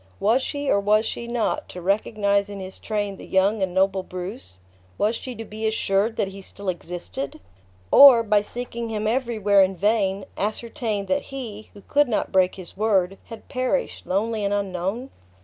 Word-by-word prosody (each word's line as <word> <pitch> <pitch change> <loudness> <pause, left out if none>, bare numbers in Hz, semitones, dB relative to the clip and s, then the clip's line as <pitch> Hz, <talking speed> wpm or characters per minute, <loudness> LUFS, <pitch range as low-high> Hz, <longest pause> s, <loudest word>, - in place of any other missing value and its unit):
Was 225 +6 +3
she, 285 +1 -3
or 200 - +3
was 210 +2 +3
she 235 +1 -4
not, 235 -1 -1
to 180 - -8
recognize 200 +1 +1
in 200 -1 -7
his 190 0 -8
train 205 -2 -2
the - - -11
young 195 +3 +2
and 190 -1 0
noble 190 +1 +2
Bruce? 185 - -7 0.4
Was 215 +3 +1
she 255 +1 -6
to 225 - -7
be 220 +1 -3
assured 220 0 +1
that 195 - 0
he 195 0 -10
still 195 +1 -6
existed? 170 -5 -5 0.5
Or, 260 -5 +9
by 210 -2 +3
seeking 235 +1 -5
him 215 -1 -2
everywhere 220 -4 +2
in 190 0 +2
vain, 200 -1 +1
ascertain 215 0 -2
that 280 +6 0
he, 230 -6 -7
who 200 - -13
could 290 0 +3
not 220 - -1
break 185 -1 +3
his 185 -3 -8
word, 195 -3 +1
had 225 -1 -11
perished, 255 +1 -2
lonely 215 +3 0
and 200 0 +1
unknown? 200 +6 -3
205 Hz, 180 wpm, -24 LUFS, 195-230 Hz, 0.5 s, Or